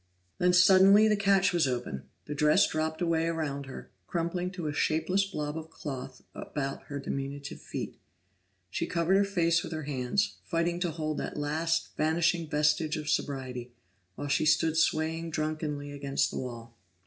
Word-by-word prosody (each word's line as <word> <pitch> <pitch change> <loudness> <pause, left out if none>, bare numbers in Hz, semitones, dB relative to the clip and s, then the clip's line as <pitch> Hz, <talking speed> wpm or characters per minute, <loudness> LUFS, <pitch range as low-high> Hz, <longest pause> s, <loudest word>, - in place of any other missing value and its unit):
Then 180 0 +4
suddenly 190 +3 +7
the 215 - +4
catch 200 -1 +3
was 170 -5 +3
open; 120 - -4 0.2
the 150 - -4
dress 150 +6 +4
dropped 160 +1 -2
away 165 -1 +1
around 145 -4 -2
her, 135 - -9 0.2
crumpling 175 +1 -1
to 175 -3 -5
a 150 - -1
shapeless 180 +6 +1
blob 150 -6 -4
of 160 0 -6
cloth 135 -4 -7
about 135 -2 -4
her 145 - -5
diminutive 140 0 -5
feet. - - -6 0.7
She - - -2
covered 170 +2 +2
her 200 - +5
face 170 -4 +2
with 160 - -6
her 155 -1 -4
hands, 145 +9 -1
fighting 170 0 0
to 175 -1 0
hold 155 -1 -3
that - - -4
last, 160 +3 -1
vanishing 160 +1 +1
vestige 150 +1 +2
of 155 0 -4
sobriety, 130 -5 -2 0.4
while 145 - -5
she 140 +2 +2
stood 160 +1 +3
swaying 160 0 +1
drunkenly 155 -2 -3
against 140 -1 -1
the - - -4
wall. 115 -2 -7
155 Hz, 165 wpm, -29 LUFS, 145-170 Hz, 0.7 s, suddenly